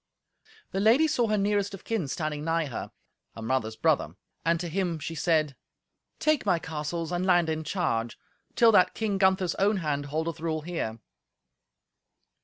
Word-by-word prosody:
The 195 - -1
lady 235 +10 +5
saw 245 -6 +1
her 215 0 +1
nearest 200 0 0
of 195 - -14
kin 220 -10 -2
standing 150 +1 -3
night 165 -2 0
her—her 115 -1 -10
mother's 110 -2 -1
brother—and 165 +7 -1
to 175 - -3
him 175 -1 -1
she 155 +2 -5
said, 155 -3 +1 0.6
"Take 310 -2 +2
my 175 - +2
castles 160 +1 -4
and 175 0 -1
land 175 -3 +3
in 160 0 -2
charge, 120 - -1 0.4
till 230 -1 +6
that 185 -3 +4
King 210 -3 -1
Gunther's 190 -2 +3
own 200 +2 +3
hand 145 -5 -2
holdeth 160 +3 -3
rule 160 -1 -2
here." 150 -9 -4
170 Hz, 155 wpm, -27 LUFS, 155-195 Hz, 0.6 s, till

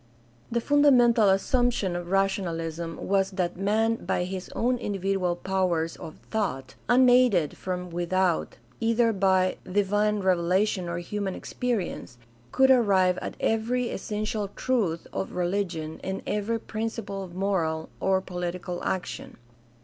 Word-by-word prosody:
The 235 - +1
fundamental 245 -6 +5
assumption 200 -1 +1
of 175 0 -5
rationalism 170 -4 -1
was 195 0 +2
that 185 -3 -2
man 220 +4 +1
by - - 0
his 185 0 -5
own 245 +1 +1
individual 195 -4 -1
powers 175 -3 -1
of 155 - -9 0.2
thought, 135 - -2 0.2
unaided 245 - +5
from 180 -1 -4
without, 175 0 0 0.2
either 230 0 +2
by 190 -1 +2
divine 205 +1 +1
revelation 185 +1 +1
or 170 - -3
human 195 +2 -3
experience, 225 - -3 0.3
could 265 0 +5
arrive 195 -7 +4
at - - -5
every 235 +2 0
essential 215 0 -3
truth 205 -11 0
of - - -3
religion 175 -3 -2
and 190 0 -4
every 210 +2 -1
principle 220 -3 -4
of 180 -2 -9
moral 170 -5 -1
or 190 0 +2
political 180 -1 -5
action. 180 -11 -4
195 Hz, 125 wpm, -26 LUFS, 180-220 Hz, 0.3 s, fundamental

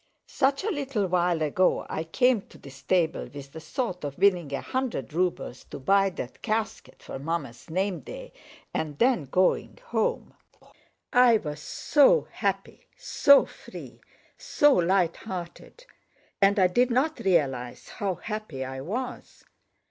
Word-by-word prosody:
Such 275 +2 0
a 435 - 0
little 275 - -1
while 175 -2 +1
ago 180 +5 +1
I 160 - -4
came 245 +6 +2
to - - -15
this 135 -1 -13
table 170 -1 0
with 140 -1 -10
the 160 - -8
thought 180 +3 -4
of 140 -1 -5
winning 180 -7 +3
a 140 - -2
hundred 255 - -3
rubles 175 -6 -2
to - - -9
buy 195 +8 +3
that 145 -9 -8
casket 220 -1 -3
for - - -7
Mamma's 145 -5 -4
name 185 +2 -1
day - - -10 0.4
and 150 -2 -3
then 240 - +2
going 180 +8 +1
home. 480 0 -1 0.8
I 245 -2 +6
was 150 -6 -6
so 300 - +3
happy, - - -3
so 280 - +5
free, - - -12 0.4
so 295 -1 +3
lighthearted! 180 - -2 0.6
And 200 +1 +4
I 190 - +5
did 240 +8 +2
not 270 +6 +1
realize 135 -10 0
how 195 -3 -1
happy 210 -13 -5
I 130 0 -6
was! 235 - -6
185 Hz, 140 wpm, -26 LUFS, 155-245 Hz, 0.8 s, I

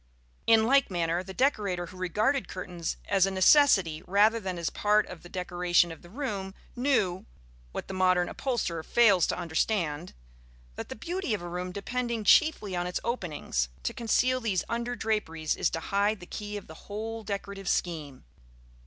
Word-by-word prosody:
In 225 -1 +6
like 275 +3 +4
manner, 170 -1 0
the 190 +1 -9
decorator 200 -7 0
who 185 +2 -12
regarded 215 +9 0
curtains 180 -2 -5
as 195 -1 +3
a - - 0
necessity 190 - +5
rather 210 +4 +4
than 190 -4 -4
as 170 -1 -2
part 210 0 +2
of 180 -2 -10
the 175 - -13
decoration 175 -1 +1
of 165 - -10
the 175 - -15
room 200 -5 -4 0.2
knew 220 -8 +1 0.4
(what - - -5
the - - -6
modern 185 -1 +3
upholsterer 230 -11 -2
fails 200 -1 +4
to - - -1
understand) 165 -1 -1 0.6
that, - - -7
the - - -5
beauty 345 - -2
of 175 - -7
a - - -5
room 180 +1 -4
depending 235 +3 -3
chiefly 215 - +4
on 175 0 -1
its 180 - -2
openings, 155 - -2
to - - -2
conceal 250 +3 +1
these 200 -7 0
under 235 +1 -2
draperies 200 -9 -1
is - - +1
to 165 - -3
hide 200 +4 0
the 175 - -10
key 210 +2 -6
of 205 - -9
the 160 - -14
whole 220 +2 -5
decorative 200 -2 -5
scheme. 150 -6 -2
195 Hz, 175 wpm, -28 LUFS, 175-225 Hz, 0.6 s, In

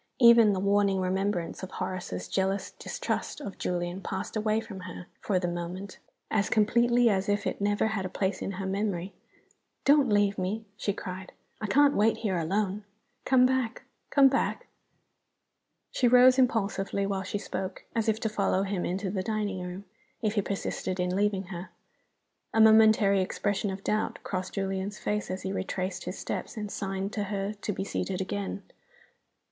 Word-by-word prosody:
Even 235 -3 +8
the 190 - 0
warning 200 0 +2
remembrance 185 -2 -1
of 190 - -6
Horace's 185 - -4
jealous 190 - -1
distrust - - -4
of 200 -10 -7
Julian 175 +1 -2
passed 190 +2 -4
away 215 0 +1
from 205 -4 -8
her, 180 -1 -8
for 195 - 0
the 180 -1 0
moment, 175 +3 -5 0.3
as 210 -2 +1
completely 235 +3 +4
as 195 -1 +1
if 205 0 +1
it - - -2
never 205 +1 +2
had 215 -3 -2
a 185 - -3
place 190 0 -1
in 195 - -3
her 190 +1 -4
memory. 195 -1 -2 0.7
"Don't 285 -3 +5
leave 205 -1 +2
me!" 205 +5 -2
she 205 - -1
cried. 185 -1 -7 0.3
"I 215 - -1
can't 285 +5 +5
wait 220 +2 +3
here 190 -6 -1
alone. 195 +4 -1 0.4
Come 255 -1 +5
back 255 -3 0 0.3
come 280 -2 +6
back!" 270 +1 0 1.3
She 250 - +2
rose 250 +2 +7
impulsively 200 -5 +1
while 195 -1 -1
she 190 +2 -3
spoke, 190 -2 -5
as 225 -1 +1
if 220 0 +1
to - - +1
follow 200 -2 +1
him 195 -2 -2
into 190 +1 -2
the 190 -2 -1
dining 210 -3 -2
room, 180 +2 -6 0.3
if 215 -3 0
he 210 - +2
persisted 190 -1 -3
in 180 0 0
leaving 200 -1 +1
her. 175 +2 -6 0.9
A - - +4
momentary 220 -3 +6
expression 205 +2 -1
of 190 +1 -5
doubt 215 0 0
crossed 185 -1 -4
Julian's 195 +1 -2
face 210 0 -2
as 185 +1 -4
he 190 - -2
retraced 190 -1 -3
his - - -5
steps - - -5
and 210 -1 -4
signed 195 +1 -3
to 205 -2 -1
her 200 0 -2
to 210 0 -4
be 195 - -3
seated 195 -1 -3
a 190 - -1
gain. 100 - -4
200 Hz, 175 wpm, -28 LUFS, 190-215 Hz, 1.3 s, Even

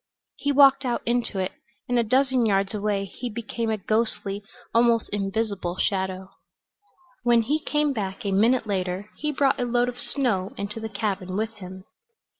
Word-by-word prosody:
He 285 - 0
walked 275 -1 +6
out 245 -2 -1
into 235 -3 0
it, 185 0 -1 0.4
and 245 -1 +2
a - - +3
dozen 260 +2 +2
yards 195 0 +1
away 205 -1 0
he 240 +5 -6
became 230 0 -3
a 220 - +1
ghostly, 210 -1 -1 0.3
almost 230 -1 +4
invisible 200 -3 -2
shadow. 190 -1 -1 0.9
When 240 -1 +4
he 295 +7 +1
came 300 -1 0
back 205 0 -4
a 200 - 0
minute 225 +5 +3
later 190 0 -2
he 300 0 -1
brought 280 -1 +2
a - - +1
load 245 0 +2
of 245 0 -8
snow 240 -7 -1
into 205 +2 -3
the 220 0 -5
cabin 195 -3 -2
with 220 +1 -1
him. 185 -1 -9
220 Hz, 170 wpm, -25 LUFS, 195-245 Hz, 0.9 s, walked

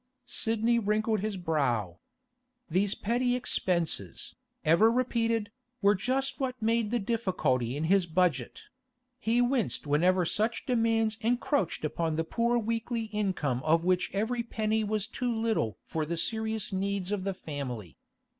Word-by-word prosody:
Sidney 230 -1 +1
wrinkled 215 0 +1
his 210 0 -2
brow. 125 - 0 0.7
These 195 +4 +1
petty 245 +3 +1
expenses, 170 - -2 0.3
ever 170 +9 +5
repeated, 230 -3 0 0.3
were 200 0 +5
just 260 +7 -1
what 260 -2 -2
made 225 0 +1
the 240 - +1
difficulty 180 - 0
in 150 - -2
his 185 +2 +3
budget; 160 -7 0 0.6
he 235 +1 +2
winced 245 - 0
whenever 175 +5 +3
such 220 +7 -1
demands 225 -2 +1
encroached 240 - 0
upon 160 +1 -1
the 165 - 0
poor 235 +7 +1
weekly 230 +1 -1
income 180 -12 0
of 165 +2 +3
which 185 0 +2
every 225 +5 0
penny 220 -1 0
was 210 -1 0
too 245 +2 -2
little 220 - 0
for 160 - -2
the 170 +2 -3
serious 220 +1 -2
needs 195 0 -1
of 205 -3 -1
the 195 -1 -2
family. 125 - -6
210 Hz, 140 wpm, -29 LUFS, 165-230 Hz, 0.7 s, ever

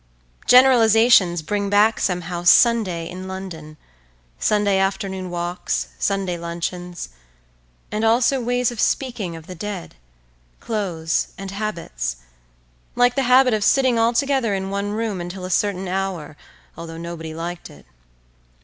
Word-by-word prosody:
Generalizations 225 -8 +5
bring 200 +4 -2
back 210 +2 +3
somehow 175 -1 -2
Sunday 180 -3 +4
in 185 +2 -8
London, 170 -5 -8 0.6
Sunday 205 -2 +2
afternoon 195 -1 -2
walks, 175 0 -3
Sunday 195 -3 -1
luncheons, 175 - -5 0.8
and 215 +1 -2
also 240 +4 +3
ways 245 0 0
of 235 - -9
speaking 230 -10 -1
of 165 -1 -11
the 185 - -8
dead, 195 0 -6 0.7
clothes, 175 -7 -2
and 195 0 -7
habits—like - - -4
the 275 - 0
habit 255 -1 +6
of 215 -1 0
sitting 260 0 +3
all 230 +1 +3
together 255 -4 +1
in 190 0 -4
one 200 +1 -2
room 210 -3 -2
until 180 +1 -6
a 185 - -5
certain 195 0 0
hour, 185 -5 -3 0.4
although 165 -1 -8
nobody 165 -1 -7
liked 170 +1 -6
it. - - -16
190 Hz, 130 wpm, -21 LUFS, 170-220 Hz, 0.8 s, habit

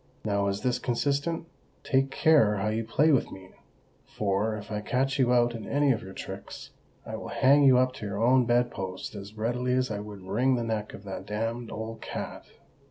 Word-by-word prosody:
Now 100 -1 +1
is 100 +1 -2
this 125 +1 0
consistent? 145 +7 -1 0.4
Take 135 0 +2
care 140 -8 +4
how 105 +2 -1
you 110 +1 -1
play 145 +8 +3
with 135 - +2
me; 95 -1 -11 0.6
for—if 105 +1 -2
I 105 0 -2
catch 135 +5 0
you 125 -2 +3
out 120 -1 +3
in 110 -3 -7
any 145 0 +3
of 115 - 0
your 95 0 -9
tricks—I - - -9
will - - -7
hang 140 +2 +4
you 130 -2 +7
up 130 0 +2
to 105 - -5
your 100 0 -4
own 125 +2 +4
bedpost 120 -6 -1
as 100 0 -9
readily 125 +3 0
as 130 -2 +1
I 105 - -2
would 105 -2 -9
wring 125 +8 +1
the 120 - -1
neck 110 -2 -3
of 95 - -12
that 95 -1 -7
damned 115 +3 -3
old 110 +1 -6
cat." - - -6
115 Hz, 195 wpm, -28 LUFS, 105-130 Hz, 0.6 s, you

